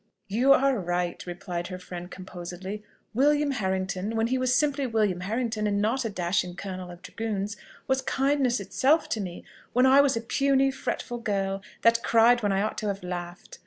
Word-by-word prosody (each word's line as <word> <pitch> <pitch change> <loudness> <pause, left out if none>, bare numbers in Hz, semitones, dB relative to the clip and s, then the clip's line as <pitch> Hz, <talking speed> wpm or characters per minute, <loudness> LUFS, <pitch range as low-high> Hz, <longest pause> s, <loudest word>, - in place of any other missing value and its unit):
"You 240 +7 +3
are 275 -3 +4
right," 175 -1 -2
replied 175 0 -4
her 185 - -6
friend 180 -1 -8
composedly. 185 +2 -7 0.3
"William 290 +4 +3
Harrington, 190 -2 -2
when 225 0 +2
he 255 +3 0
was 255 -1 +2
simply 280 0 +1
William 210 -6 +1
Harrington, 220 +2 -1
and 200 -1 +1
not 230 +5 0
a - - 0
dashing 180 -2 -1
colonel 185 -2 -6
of 175 +1 -11
dragoons, 210 -2 -3 0.3
was 265 -1 +1
kindness 265 -2 +1
itself 210 - +2
to 220 - -1
me, 180 -3 -7 0.3
when 250 +2 +4
I 265 +2 +7
was 275 -4 +2
a - - -2
puny, 270 +3 +2
fretful 245 -2 -4
girl, 195 -3 -1 0.2
that 230 0 +5
cried 235 +2 +5
when 205 -2 +1
I 195 +1 +1
ought 215 - -2
to 215 - -3
have 195 -2 -3
laughed. 175 -1 -7
210 Hz, 185 wpm, -27 LUFS, 185-255 Hz, 0.3 s, I